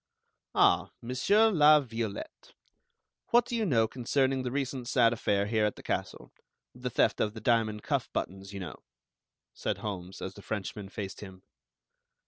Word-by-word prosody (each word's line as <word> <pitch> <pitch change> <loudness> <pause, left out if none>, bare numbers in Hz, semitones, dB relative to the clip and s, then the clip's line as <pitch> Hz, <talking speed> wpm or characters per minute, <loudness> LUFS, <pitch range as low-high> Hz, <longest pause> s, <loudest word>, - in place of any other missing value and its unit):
"Ah, - - +4
Monsieur 200 - +3
La 155 -4 +7
Violette, 115 -6 -6 0.7
what 240 0 +4
do 240 - -3
you 225 -3 0
know 115 -7 +3
concerning 130 +2 0
the 125 - -2
recent 130 -2 -3
sad 120 -2 +4
affair 100 -3 +1
here 110 0 +1
at 105 - +1
the - - -13
castle, - - -4 0.4
the 125 0 -4
theft - - +2
of 105 +1 0
the - - -6
diamond 110 -1 +1
cuff - - -1
buttons, 95 +1 -4
you 100 - -6
know?" 90 -3 -7 0.7
said - - -2
Holmes, 95 -3 -6
as 95 - -5
the 100 - -12
Frenchman 100 -1 -5
faced 95 -2 -6
him. 95 -2 -11
115 Hz, 160 wpm, -30 LUFS, 100-130 Hz, 0.7 s, La